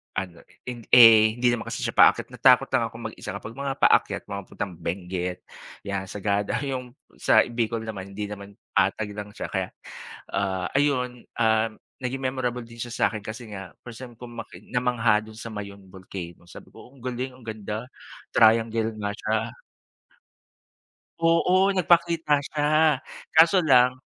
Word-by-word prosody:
ano, 90 -3 -4 0.2
eh, 125 -1 -6 0.2
eh, 115 -3 +9
hindi 120 0 +2
naman 120 -1 -3
kasi - - -4
siya - - -1
paakyat - - +5
natakot - - +4
lang - - +2
akong - - -11
mag-isa - - -7
kapag 110 - -7
mga 140 0 -3
paakyat - - +3
mga 100 0 -3
papuntang 95 -4 -5
Benguet 90 0 -4 0.4
yan, 100 -1 -4
Sagada. 100 +1 -1
Yung 130 -2 -5 0.2
sa - - +5
Bicol 115 -1 -2
naman 100 -3 -7
hindi 105 0 -4
naman, 100 -1 -9 0.2
patag 105 -2 +1
lang 105 0 -7
siya - - -5
kaya, 95 -2 -1 0.6
ah, 95 -2 -1
ayun, 125 -4 0 0.2
ah, 110 -1 +3 0.4
naging 135 +2 -3
memorable 125 -2 -2
din 115 0 -14
siya 120 0 -5
sakin 110 -2 +1
kasi 110 +1 -8
nga 95 -4 -8
first 120 -1 -10
time 120 -2 -11
kung 120 +1 -11
makita 115 -1 -9 0.2
mamangha 120 -3 +2
dun 110 0 -13
sa 115 0 -8
Mayon 100 -2 -8
Volcano 90 -2 -9
sabi 85 - -13
ko - - -15
ang 125 - -18
galing 125 +1 -4
ang 130 - -17
ganda 110 +1 -5 0.4
triangle 115 0 +3
nga 105 -1 -2
siya. - - -1 1.8
Oo 180 +4 +3
nagpakita 170 -4 +3
siya 150 -1 -1 0.7
kaso 165 +4 +6
lang 130 -5 +4
115 Hz, 155 wpm, -25 LUFS, 100-125 Hz, 1.8 s, eh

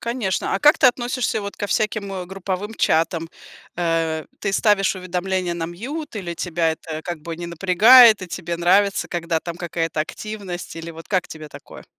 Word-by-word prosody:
Конечно. 235 -6 -2
А - - +1
как 295 +6 +5
ты 270 - +6
относишься 245 -2 0
вот 200 0 -6
ко 205 - -3
всяким, 210 -2 -1
э, 180 -2 -5
групповым 195 +3 -5
чатам? 165 +1 +1 0.5
Э, 165 -2 0 0.2
ты 195 -2 -1
ставишь 200 -2 +2
уведомления 185 -1 -2
на 165 -1 -3
mute, 235 - -6
или 170 -3 -5
тебя 165 -2 0
это, 160 -1 -7
как 175 -3 -5
бы, 165 +1 -6
не 170 0 -6
напрягает, 205 +7 +7
и - - -5
тебе 170 -1 -4
нравится, 195 +3 +2
когда 170 -2 -2
там 170 -1 -6
какая-то 165 -2 -2
активность? 190 0 -6
Или 165 0 -7
вот 165 0 -12
как 185 -4 0
тебе 155 -1 -9
такое? - - -13
180 Hz, 180 wpm, -21 LUFS, 170-205 Hz, 0.5 s, напрягает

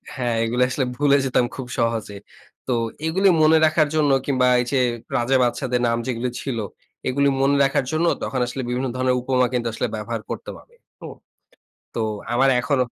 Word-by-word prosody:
হ্যাঁ, 120 -4 -1
এগুলি 120 +2 +1
আসলে 130 0 -1
ভুলে 140 +1 +3
যেতাম 125 -2 +2
খুব 130 -2 -6
সহজে। 115 -3 -1 0.5
তো - - -1 0.3
এগুলি 190 +5 +2
মনে 155 +1 +6
রাখার 155 -1 +3
জন্য 150 -2 +3
কিংবা 130 -3 +2
এই 125 - 0
যে 135 - +1 0.4
রাজা-বাদশাদের 125 0 +1
নাম 115 0 +1
যেগুলি 125 0 -2
ছিল 135 -4 -3 0.5
এগুলি 140 +2 +2
মনে 140 +1 +3
রাখার 135 -1 +1
জন্য 160 +2 +1 0.2
তখন 130 - -2
আসলে 130 +2 -5
বিভিন্ন 125 +2 -1
ধরনের 130 0 +1
উপমা 125 0 +2
কিন্তু 120 -1 -1
আসলে 125 - -2
ব্যবহার 110 +1 -4
করতাম - - -6
আমি। 475 - -27 0.3
হু? - - -7 0.9
তো 115 - -2 0.3
আমার 135 +3 +3
এখনো 140 0 +1
130 Hz, 170 wpm, -22 LUFS, 120-140 Hz, 0.9 s, মনে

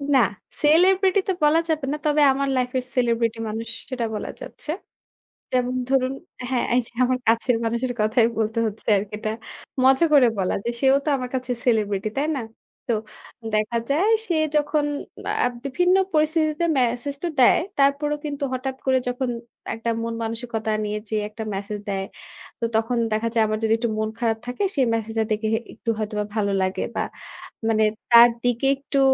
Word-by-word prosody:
না, - - +7 0.4
সেলিব্রিটি 375 +6 +5
তো - - +3
বলা 300 +2 +5
যাবে 310 -3 0
না। 300 - -1
তবে 300 0 +3
আমার 275 +1 -1
লাইফ 250 -1 0
এর 255 - -1
সেলিব্রিটি 230 -2 +1
মানুষ 225 +1 -4 0.2
সেটা 250 -3 -2
বলা 210 - -4
যাচ্ছে। 305 - -7 0.8
যেমন 250 0 +1
ধরুন 265 -1 +2 0.4
হ্যাঁ, 255 -2 +1
এইযে 245 -2 0
আমার 255 0 +1
কাছের 230 +2 +3
মানুষের 235 +2 -1
কথাই 225 +2 +3
বলতে 220 +1 0
হচ্ছে 215 0 -8
আরকি 205 +1 -5
এটা, 215 0 -2 0.5
মজা 265 +5 +5
করে 275 -4 +7
বলা 185 -1 0
যে - - 0
সেও 270 0 +5
তো 305 - +1
আমার 250 -1 -4
কাছে 255 -1 -2
সেলিব্রিটি, 215 -3 +1
তাই 290 - +1
না? 270 - -2 0.5
তো - - +3 0.6
দেখা 215 +2 0
যায় 335 +10 +2 0.2
সে 345 - +1 0.2
যখন 295 0 +2 0.6
আ - - +4 0.2
বিভিন্ন 355 +7 +2 0.2
পরিস্থিতিতে 310 +1 +2
মেসেজ 250 +3 0
তো - - +1
দেয়। 250 - +6 0.2
তারপরও 280 +2 +3
কিন্তু 285 -1 -4
হঠাৎ 260 +1 -3
করে 260 -1 +3
যখন 250 +1 -1 0.4
একটা 225 +1 -3
মন-মানসিকতা 230 -1 -3
নিয়ে 210 0 -2
যে 220 - -1
একটা 220 +1 -7
মেসেজ 205 +2 -4
দেয়। 195 -1 -2 0.5
তো 235 - 0
তখন 225 +2 +1
দেখা 215 +2 0
যায় 225 -1 +4
আমার 215 0 -1
যদি 220 0 +3
একটু 235 0 -1
মন 215 0 0
খারাপ 225 -2 +1
থাকে 250 +10 -2
সে 280 - +2
মেসেজটা 225 0 -1
দেখে 215 +1 0
হে 220 - +2
একটু 230 - -6
হয়তোবা 210 -1 -2
ভালো 200 -2 +1
লাগে 185 0 -1
বা - - 0 0.6
মানে 220 -1 +3 0.3
তার 235 0 +10
দিকে 245 +2 +1
একটু 275 0 -2
245 Hz, 175 wpm, -23 LUFS, 220-275 Hz, 0.8 s, তার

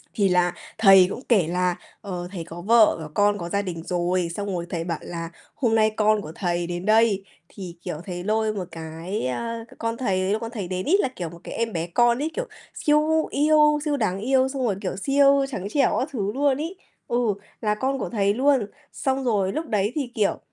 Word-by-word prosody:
Thì 200 -3 +2
là 180 -1 +2 0.2
thầy 195 -4 +7
cũng 245 - -5
kể 195 -9 +4
là, 180 +1 0 0.3
ờ, 180 -3 -5
thầy 175 -4 -5
có 170 +1 -9
vợ 220 +3 +5
có 150 - -8
con, 205 0 +3
có 170 -2 -5
gia 200 +2 0
đình 170 -4 -5
rồi, 175 0 0
xong 205 0 -4
rồi 170 0 -3
thầy 165 -2 -3
bảo 170 -2 -3
là 165 -1 -6 0.3
"Hôm 235 -6 +1
nay 220 -1 +4
con 215 -1 +3
của 155 - -8
thầy 175 -2 -1
đến 175 +2 -4
đây." 215 -2 +3 0.3
Thì, 180 -4 -7
kiểu, - - -4
thầy 175 -2 -5
lôi 215 +1 +1
một 185 -4 -4
cái 165 +1 -4
a, 230 - -4
c - - -16
con 230 0 -2
thầy 195 -7 0
ấy, 190 +1 0
lúc 220 - -1
con 230 0 -5
thầy 205 -7 -5
đến 185 0 -3
ấy, 370 +6 +4
là, 260 - +1
kiểu, 170 -3 -4
một 170 - -12
cái - - -7
em 230 -1 -2
bé 165 0 -2
con 240 +6 +3
ấy, 320 - -2
kiểu, - - -3 0.3
siêu 310 +1 +2
yêu, 300 0 +4
siêu 290 -1 0
đáng 190 -6 -1
yêu 260 +3 +2
xong 265 -2 -2
rồi, 205 - +1
kiểu, 185 -2 -3
siêu 275 +5 +4
trắng 200 -6 -4
trẻo 275 +2 +2
các 270 - -2
thứ 205 -6 -2
luôn 280 -1 +2
ấy, 330 +5 -4 0.3
ừ, 240 - 0 0.4
là 210 -1 +1
con 265 +4 -1
của - - -3
thầy 200 -3 +1
luôn. 265 -2 +3 0.3
Xong 265 0 -1
rồi 200 -5 +1
lúc 315 +5 -3
đấy 210 -1 0
thì, 275 -5 -2
kiểu, 210 -3 +1
210 Hz, 235 wpm, -24 LUFS, 180-255 Hz, 0.4 s, thầy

